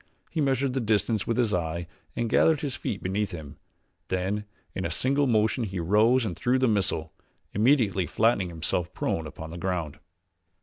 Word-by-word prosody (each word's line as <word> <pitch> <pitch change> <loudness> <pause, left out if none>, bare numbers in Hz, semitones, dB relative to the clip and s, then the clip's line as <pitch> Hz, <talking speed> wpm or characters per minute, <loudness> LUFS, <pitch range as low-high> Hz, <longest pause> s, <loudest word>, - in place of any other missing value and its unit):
He 160 - -1
measured 135 -1 +1
the 135 - 0
distance 110 -2 +1
with 115 - 0
his 115 -4 +2
eye 85 0 -1 0.3
and 120 - 0
gathered 155 +7 +4
his 140 -5 -3
feet 100 - -4
beneath 100 +1 -1
him, 75 -3 -8 0.5
then 95 +3 -1 0.3
in 95 - -3
a 85 - -1
single 140 - +1
motion 110 +1 +2
he 95 -4 -3
rose 110 +8 +4
and 90 -5 -3
threw 125 +8 +1
the 130 0 +3
missile, 95 -7 0 0.4
immediately 105 - +3
flattening 110 -5 +2
himself 85 +1 -2
prone 80 -1 -1
upon 80 +1 -8
the 85 - -7
ground. 85 -4 -2
105 Hz, 175 wpm, -27 LUFS, 85-120 Hz, 0.5 s, gathered